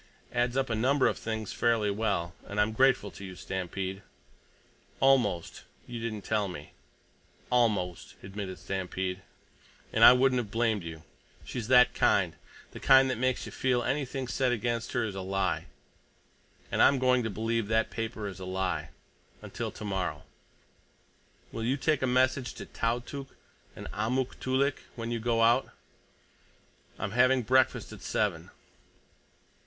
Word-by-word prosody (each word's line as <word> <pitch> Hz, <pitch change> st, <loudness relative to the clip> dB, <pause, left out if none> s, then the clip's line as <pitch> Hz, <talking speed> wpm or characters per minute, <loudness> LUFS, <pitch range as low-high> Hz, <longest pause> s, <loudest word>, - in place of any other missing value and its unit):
Adds 120 Hz, +1 st, 0 dB
up 130 Hz, -3 st, 0 dB
a -, -, +1 dB
number 130 Hz, +5 st, +2 dB
of -, -, +1 dB
things 110 Hz, -2 st, -4 dB
fairly 115 Hz, -3 st, +2 dB
well. 100 Hz, -5 st, -1 dB
And 100 Hz, -, -4 dB
I'm 105 Hz, +1 st, +3 dB
grateful 125 Hz, -3 st, +3 dB
to -, -, -11 dB
you, 95 Hz, -1 st, -8 dB
Stampede. 95 Hz, +1 st, -4 dB, 1.0 s
Almost—you 120 Hz, -2 st, 0 dB
didn't 110 Hz, -3 st, -4 dB
tell 105 Hz, -2 st, 0 dB
me." 80 Hz, -5 st, -9 dB, 0.8 s
"Almost," 105 Hz, -8 st, +1 dB
admitted 95 Hz, -1 st, -6 dB
Stampede. 95 Hz, 0 st, -3 dB, 0.7 s
"And -, -, +3 dB
I -, -, +11 dB
wouldn't 130 Hz, 0 st, +3 dB
have 115 Hz, -4 st, -4 dB
blamed 115 Hz, -1 st, +1 dB
you. 80 Hz, -2 st, -8 dB, 0.4 s
She's 120 Hz, -4 st, -5 dB
that 125 Hz, -1 st, +6 dB
kind—the -, -, -1 dB
kind 135 Hz, 0 st, +6 dB
that 125 Hz, -, -3 dB
makes 130 Hz, 0 st, 0 dB
you -, -, -8 dB
feel 125 Hz, -2 st, +1 dB
anything 135 Hz, -2 st, -2 dB
said 130 Hz, +1 st, +1 dB
against 115 Hz, 0 st, -2 dB
her 120 Hz, -, +1 dB
is 110 Hz, -3 st, -3 dB
a 95 Hz, -, -5 dB
lie. 95 Hz, -1 st, -1 dB, 1.0 s
And -, -, +1 dB
I'm 140 Hz, -, +6 dB
going 125 Hz, -1 st, +3 dB
to 110 Hz, -, -2 dB
believe 115 Hz, +1 st, -1 dB
that 110 Hz, +1 st, +1 dB
paper 110 Hz, -2 st, -4 dB
is 95 Hz, -1 st, -8 dB
a 95 Hz, -, -6 dB
lie—until 95 Hz, 0 st, -5 dB
tomorrow. 95 Hz, -8 st, -4 dB, 1.3 s
Will 115 Hz, -, -5 dB
you 130 Hz, +4 st, +1 dB
take 150 Hz, -1 st, +1 dB
a 130 Hz, -, +1 dB
message 130 Hz, 0 st, +1 dB
to -, -, -7 dB
Tautuk 125 Hz, +4 st, -3 dB, 0.4 s
and -, -, -8 dB
Amuk 120 Hz, +5 st, -1 dB
Toolik 135 Hz, +2 st, +1 dB, 0.2 s
when 115 Hz, 0 st, -4 dB
you 120 Hz, -, -1 dB
go 115 Hz, 0 st, +1 dB
out? 120 Hz, +3 st, +3 dB, 1.3 s
I'm 100 Hz, -, -3 dB
having 125 Hz, +2 st, +4 dB
breakfast 130 Hz, +4 st, +2 dB
at -, -, -11 dB
seven. -, -, -1 dB
115 Hz, 145 wpm, -29 LUFS, 100-125 Hz, 1.3 s, I